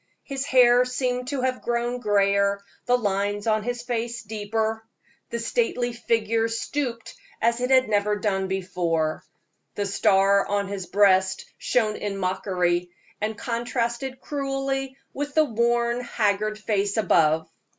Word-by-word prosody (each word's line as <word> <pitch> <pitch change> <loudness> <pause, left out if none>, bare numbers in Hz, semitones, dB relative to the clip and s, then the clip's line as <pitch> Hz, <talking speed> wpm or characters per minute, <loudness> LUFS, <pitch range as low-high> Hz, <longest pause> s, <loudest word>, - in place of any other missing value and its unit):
His 275 -1 -4
hair 245 -2 +6
seemed 250 0 -2
to 275 -1 -2
have 255 0 -1
grown 240 +1 -1
grayer, 200 -2 +2 0.3
the 245 0 +4
lines 205 -2 -1
on 215 -1 +2
his 240 +2 -4
face 235 -1 -3
deeper; 220 +1 -2 0.5
the 235 - -3
stately 240 +1 0
figure 225 -1 +1
stooped 230 +1 -3 0.3
as 235 +1 +1
it 250 - 0
had 260 -1 +5
never 210 0 +1
done 195 -2 -1
before; 175 -4 -1 0.5
the 205 - -1
star 195 0 +3
on 200 -1 0
his 195 -3 -5
breast 190 -1 +3
shone 215 -3 +1
in 200 -1 -3
mockery, 180 -2 0 0.3
and 215 0 -2
contrasted 240 +2 -2
cruelly 270 -1 -3 0.2
with 290 +1 -4
the 310 -1 +5
worn, 235 0 +1
haggard 215 -2 0
face 205 -1 -1
above. 160 -6 +3
225 Hz, 135 wpm, -25 LUFS, 200-245 Hz, 0.5 s, hair